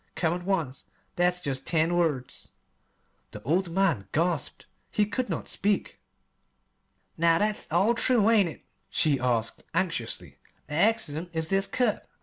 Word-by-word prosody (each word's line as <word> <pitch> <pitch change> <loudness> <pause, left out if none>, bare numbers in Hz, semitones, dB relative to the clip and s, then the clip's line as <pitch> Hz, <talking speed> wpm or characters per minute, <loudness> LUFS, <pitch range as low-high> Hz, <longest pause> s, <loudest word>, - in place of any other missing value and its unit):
Come 165 -2 +1
at 175 0 -5
once.' 165 -9 -2 0.3
That's 180 0 +2
jest 135 -5 -2
ten 165 +1 +2
words." 150 -7 -2 0.8
The - - -10
old 175 +5 +1
man 165 - +1
gasped. 165 -2 -1 0.2
He 210 - +1
could 245 +2 -3
not 165 - -3
speak. 205 +1 -1 1.2
"Now, 165 0 +4
that's 210 -1 -1
all 195 +8 +3
true, 235 -2 +3
ain't 215 -6 +4
it?" - - -12 0.2
she 145 -4 +3
asked 120 -3 -1
anxiously. 165 -10 -2 0.3
"The - - -9
'accident' 175 -3 +1
is 160 0 -2
this 195 0 +2
cut. 225 +1 -1
175 Hz, 140 wpm, -27 LUFS, 155-195 Hz, 1.2 s, Now